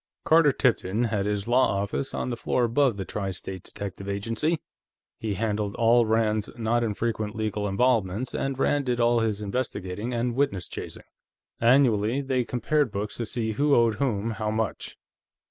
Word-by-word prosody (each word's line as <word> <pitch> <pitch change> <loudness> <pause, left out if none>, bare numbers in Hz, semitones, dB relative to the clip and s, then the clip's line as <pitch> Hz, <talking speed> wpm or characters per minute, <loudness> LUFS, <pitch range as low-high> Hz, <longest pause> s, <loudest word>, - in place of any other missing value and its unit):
Carter 160 -2 +6
Tipton 115 -4 +1
had 105 -4 0
his 105 0 -2
law 120 -4 +3
office 100 +7 -2
on 125 - -3
the - - -1
floor 125 +2 0
above 120 -1 +2
the 95 - -4
Tri 100 0 -3
State 95 0 -6
Detective 100 +1 -7
Agency. 115 +11 -1 0.6
He 110 -3 -2
handled 105 -1 -1
all 115 0 +4
Rand's 110 -1 +1
not 120 +1 +1
infrequent 110 -1 -2
legal 105 -1 -2
involvements, 110 +1 +1
and 135 -1 -2
Rand 140 0 +1
did 125 -1 0
all 120 0 +4
his 110 -2 -1
investigating 105 -1 -3
and 120 0 -1
witness 115 -9 0
chasing; - - -8 0.6
annually, 120 -1 +3
they 130 -2 0
compared 125 +3 0
books 105 +1 -3
to 115 - -3
see 110 -1 -2
who 140 +5 +2
owed 115 -1 +4
whom 115 -5 0
how 110 -1 -2
much. 110 0 -3
115 Hz, 165 wpm, -26 LUFS, 105-125 Hz, 0.6 s, Carter